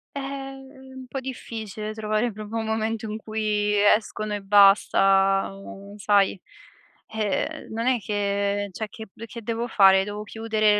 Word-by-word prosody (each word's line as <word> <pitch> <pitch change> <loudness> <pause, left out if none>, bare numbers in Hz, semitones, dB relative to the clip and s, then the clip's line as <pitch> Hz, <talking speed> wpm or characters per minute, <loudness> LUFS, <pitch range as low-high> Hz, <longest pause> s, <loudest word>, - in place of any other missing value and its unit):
Eh, - - -2
é 270 -1 -8
é - - -13
un 260 0 -9
po' 270 - -4
difficile 220 -5 -6
trovare 215 +2 -1
proprio 215 +2 -6
un 225 - -2
momento 220 0 -2
in 215 - -4
cui 210 -1 -1 0.2
escono 215 -1 -4
e 205 - -3
basta, 195 -1 +4
u 195 +1 -11
sai, 200 -1 +2 0.7
uhm, 215 -3 -2
non 230 +2 -3
è 255 -2 +3
che 200 0 -1
cioé, 215 +4 -5
che 220 +1 -10
p 220 +4 -11
che 235 +1 -9
devo 230 +2 -2
fare? 190 -4 +5
Devo 205 +1 -6
chiudere 215 -1 +1
215 Hz, 160 wpm, -24 LUFS, 200-225 Hz, 0.7 s, fare